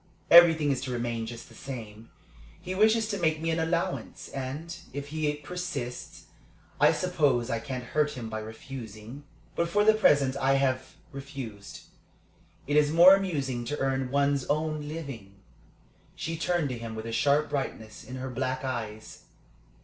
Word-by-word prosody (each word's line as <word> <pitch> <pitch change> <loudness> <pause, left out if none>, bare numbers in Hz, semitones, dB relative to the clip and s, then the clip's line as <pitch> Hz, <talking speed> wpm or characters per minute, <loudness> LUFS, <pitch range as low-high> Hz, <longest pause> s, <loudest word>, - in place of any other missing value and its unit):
Everything 165 -4 +8
is 135 - -1
to 135 - -5
remain 120 -2 -2
just 120 0 -8
the - - -16
same. 115 -4 -8 0.5
He 185 - -5
wishes 220 +3 +3
to 200 -2 -2
make 160 -2 +1
me 165 +1 -1
an 160 - 0
allowance, 170 +3 -2
and, 140 +6 -5 0.2
if 145 +1 -5
he 155 -1 0
persists, 145 -6 -6 0.6
I - - +6
suppose 145 -9 +1
I 115 - 0
can't 125 +2 -5
hurt 150 +4 0
him 115 -2 -5
by 110 0 -4
refusing. 110 +3 -9 0.3
But 170 0 0
for 205 +4 +3
the 220 - +7
present 145 -11 +3
I 135 0 +2
have 130 -1 0 0.2
refused. 135 -7 -8 0.8
It 145 +1 +1
is 150 0 +4
more 175 +4 +9
amusing 140 -11 0
to 145 +5 -3
earn 135 -1 -1
one's 140 0 +2
own 155 0 -1
living." 135 -11 -7 0.8
She 165 - -4
turned 170 -2 0
to 125 -2 -4
him 115 -1 -6
with 110 0 -6
a 115 - -4
sharp 145 +5 +2
brightness 110 -6 -4
in 125 - -8
her 130 0 -5
black 130 +1 -2
eyes. 110 -4 -5
140 Hz, 165 wpm, -28 LUFS, 120-160 Hz, 0.8 s, more